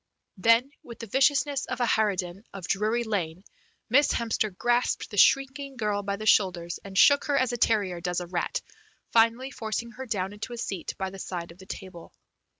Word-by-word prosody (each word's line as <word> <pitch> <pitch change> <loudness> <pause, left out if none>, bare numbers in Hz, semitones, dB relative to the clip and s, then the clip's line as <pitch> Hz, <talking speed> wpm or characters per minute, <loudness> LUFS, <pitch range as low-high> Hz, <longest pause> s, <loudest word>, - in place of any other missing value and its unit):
Then 230 +7 +4
with 235 -1 -11
the 230 - -7
viciousness 275 +4 +2
of - - -4
a 245 - +2
harridan 195 -4 0
of 190 -3 -6
Drury 215 +4 +1
Lane 185 -5 -3 0.4
Miss 285 +5 +4
Hemster 225 -2 0
grasped 240 +7 0
the 205 - -6
shrinking 275 +4 +3
girl 210 -3 0
by 200 0 -2
the 215 +2 -7
shoulders, 180 -5 +2
and 195 -1 -7
shook 285 +6 +6
her 285 -1 +1
as 255 -2 +1
a - - -1
terrier 200 -7 +1
does 180 0 -1
a 175 - -5
rat, 175 0 -2 0.5
finally 230 +4 +3
forcing 235 0 -4
her 260 +2 -8
down 195 -3 -2
into 215 +4 -7
a - - -6
seat 200 -6 -4
by 190 -1 -3
the 195 - -10
side 175 -2 -5
of 170 - -17
the 190 - -13
table. 185 -4 -9
215 Hz, 195 wpm, -27 LUFS, 190-240 Hz, 0.5 s, shook